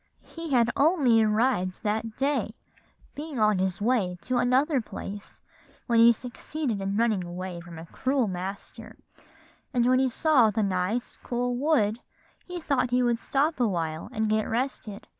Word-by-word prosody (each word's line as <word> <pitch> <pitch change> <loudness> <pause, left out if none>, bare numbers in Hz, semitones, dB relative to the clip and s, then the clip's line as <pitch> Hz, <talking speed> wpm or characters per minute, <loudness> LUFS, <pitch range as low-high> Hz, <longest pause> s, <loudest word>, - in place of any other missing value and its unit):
And - - -23
he 330 -1 -7
had 235 -3 +3
only 275 -7 +4
arrived 215 -4 +1
that 220 +1 -2
day, 265 -5 0 0.6
being 295 -3 -6
on 215 -3 +3
his 190 +1 -1
way 205 -5 +1
to 255 - -1
another 260 +3 +2
place 205 -2 -9 0.4
when 235 -2 +2
he 230 +1 +8
succeeded 245 0 -4
in 195 +1 -2
running 220 -5 +1
away 175 0 -6
from 170 -1 -11
a 160 - -8
cruel 260 +6 0
master; 190 +1 -7 0.8
and 240 -1 +3
when 255 +1 +4
he 265 0 +2
saw 255 -3 +4
the 215 +1 0
nice 195 +5 -2
cool 245 0 -2
wood, 245 -6 +1 0.5
he 360 -1 -5
thought 275 -6 0
he 250 +1 +2
would 240 -1 +1
stop 285 +4 0
awhile 170 -8 -1
and 220 -3 -1
get 215 0 0
rested. 230 -4 -3
230 Hz, 160 wpm, -27 LUFS, 200-260 Hz, 0.8 s, he